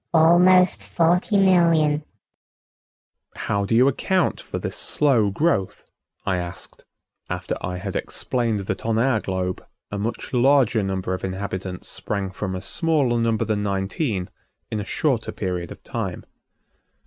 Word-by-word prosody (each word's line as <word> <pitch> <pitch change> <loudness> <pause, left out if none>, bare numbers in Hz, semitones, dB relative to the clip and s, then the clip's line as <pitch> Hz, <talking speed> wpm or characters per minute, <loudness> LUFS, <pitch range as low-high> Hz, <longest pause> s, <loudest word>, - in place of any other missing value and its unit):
"Almost 180 +3 +5
forty 180 +5 +2
million." 165 -6 +4 1.3
"How 100 -1 -1
do 115 - 0
you 125 +3 +6
account 185 +7 +1
for - - -6
this - - -4
slow 125 -9 +2
growth?" 100 - 0 0.4
I 95 - +1
asked 90 +1 -7 0.4
after - - -3
I 90 0 -3
had 95 +1 -5
explained 115 -5 -1
that 95 - -4
on 115 -1 0
our 120 -1 +2
globe 95 -1 -3 0.3
a 100 - -3
much 115 +5 -4
larger 125 -3 +4
number 95 -1 -2
of 95 - -5
inhabitants 95 -1 -4
sprang 100 -2 -3
from 95 0 -4
a 90 - -4
smaller 140 - +1
number 115 -1 +1
than 105 -1 -1
nineteen 100 - -2 0.4
in 110 - -1
a - - -3
shorter 130 -2 0
period 90 -3 -4
of - - -11
time. - - -4
110 Hz, 140 wpm, -23 LUFS, 95-150 Hz, 1.3 s, you